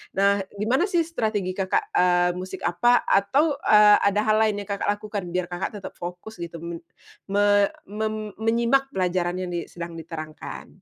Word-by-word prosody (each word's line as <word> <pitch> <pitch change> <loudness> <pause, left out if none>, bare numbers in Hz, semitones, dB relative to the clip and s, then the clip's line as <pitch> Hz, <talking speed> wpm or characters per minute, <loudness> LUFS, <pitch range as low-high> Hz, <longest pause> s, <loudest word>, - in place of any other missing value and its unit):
Nah, 200 +1 +3 0.2
gimana 240 - +1
sih 345 -3 +2
strategi 215 - -2
Kakak, 190 -1 0
eee, 180 0 +4
musik 185 0 -7
apa 240 +8 +3
atau, 280 +10 +2
eee, 210 -1 +6
ada 205 +1 +2
hal 215 0 +3
lain 215 -2 +2
yang 200 - -19
Kakak 200 0 -2
lakukan, 210 -2 -5
biar 180 -1 0
Kakak 175 +1 -3
tetap - - -8
fokus 180 +5 -8
gitu 170 -1 -6
men 170 -1 -5 0.5
me 205 0 +4 0.2
mem 215 0 -3
menyimak 235 +4 +2
pelajaran 180 -1 0
yang 180 -1 -4
di 170 -1 -3
sedang 170 -1 -7
diterangkan? 155 -1 -8
200 Hz, 165 wpm, -24 LUFS, 175-220 Hz, 0.5 s, eee